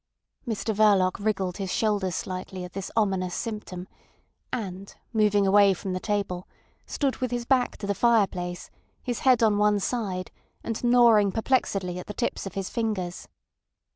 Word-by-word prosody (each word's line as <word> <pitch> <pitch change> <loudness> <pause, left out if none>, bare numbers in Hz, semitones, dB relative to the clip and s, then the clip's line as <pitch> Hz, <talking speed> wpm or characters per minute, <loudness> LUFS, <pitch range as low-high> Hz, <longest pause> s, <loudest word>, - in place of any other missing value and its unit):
Mr 220 -1 -1
Verloc 200 -2 +3
wriggled 190 -4 -1
his 195 -3 -3
shoulders 200 -5 0
slightly 185 0 -5
at 180 - -9
this 195 0 -5
ominous 190 -5 +1
symptom, 210 -5 -5 0.6
and 195 -3 -5 0.2
moving 210 -2 +3
away 200 0 +5
from 185 +1 -4
the 185 - -2
table, 195 -3 -2 0.4
stood 275 -3 -1
with 255 - -2
his 240 0 -3
back 255 0 +2
to 205 - -6
the 200 - 0
fireplace, 190 -6 +1 0.3
his 245 -2 -2
head 250 -3 +4
on 210 -2 +3
one 210 0 +3
side, 195 -4 -3 0.3
and 230 +1 -4
gnawing 235 -4 +5
perplexedly 195 -6 0
at - - -9
the 210 - -7
tips 235 - -2
of 190 - -9
his 195 -1 -2
fingers. 210 -7 -3
205 Hz, 160 wpm, -26 LUFS, 185-225 Hz, 0.6 s, away